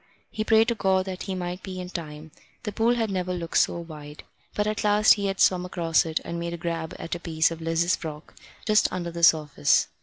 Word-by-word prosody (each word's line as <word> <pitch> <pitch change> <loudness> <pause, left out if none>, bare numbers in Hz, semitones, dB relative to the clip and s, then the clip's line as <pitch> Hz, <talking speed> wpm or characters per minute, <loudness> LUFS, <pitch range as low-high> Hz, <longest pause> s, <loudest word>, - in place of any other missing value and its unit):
He 215 - -2
prayed 220 +1 +4
to - - +2
God 190 -3 +1
that 185 -1 -6
he 190 - -2
might 180 0 -4
be 185 -1 -7
in 180 0 -7
time. 155 -2 -7 0.3
The 210 - -3
pool 230 +4 +2
had 225 -3 -1
never 185 -1 -2
looked 170 -1 0
so - - +2
wide. 150 -3 -10 0.3
But 210 - 0
at 215 0 -2
last 210 0 +5
he 200 -1 -2
had 195 0 -3
swum 180 -1 +4
across 170 -2 +1
it 160 0 -1
and 170 - -4
made 170 0 -3
a - - -8
grab 165 -1 -4
at 165 - -6
a 175 - -3
piece 165 -1 +1
of 165 0 -7
Liz's 165 +2 +1
frock 155 -2 -8 0.3
just 215 -1 +3
under 175 -2 -4
the 170 0 -6
surface. 150 - +3
175 Hz, 235 wpm, -25 LUFS, 165-195 Hz, 0.3 s, last